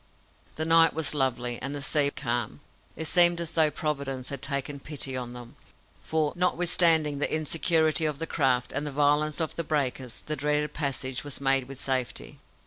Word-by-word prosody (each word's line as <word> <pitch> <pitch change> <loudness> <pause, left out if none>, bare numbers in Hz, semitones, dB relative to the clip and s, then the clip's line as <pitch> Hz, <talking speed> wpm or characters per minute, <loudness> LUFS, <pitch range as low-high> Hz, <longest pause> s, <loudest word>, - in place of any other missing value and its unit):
The 160 - -2
night 165 0 +5
was 160 -2 +1
lovely, 125 -4 -1
and 135 +3 -4
the 145 - -6
sea 145 -1 +4
calm. 120 - -4 0.3
It 160 - -5
seemed 175 +2 +5
as 170 -1 -3
though 160 -2 +3
Providence 140 -4 -4
had 140 -2 -5
taken 140 +1 -3
pity 140 -2 -2
on 125 -1 -5
them; 120 -1 -12 0.4
for, 155 -2 -1
notwithstanding 170 -4 +2
the - - +1
insecurity 160 +1 +2
of 150 -2 -2
the 165 - -3
craft 130 -6 0
and 145 +2 -3
the - - -4
violence 150 +1 +1
of 160 -2 -2
the 170 - -1
breakers, 135 -5 -2
the 155 - -2
dreaded 150 +1 -1
passage 135 -3 -2
was 145 -2 -4
made 135 -2 +1
with 135 -1 -10
safety. 130 -2 -3
145 Hz, 180 wpm, -26 LUFS, 135-155 Hz, 0.4 s, night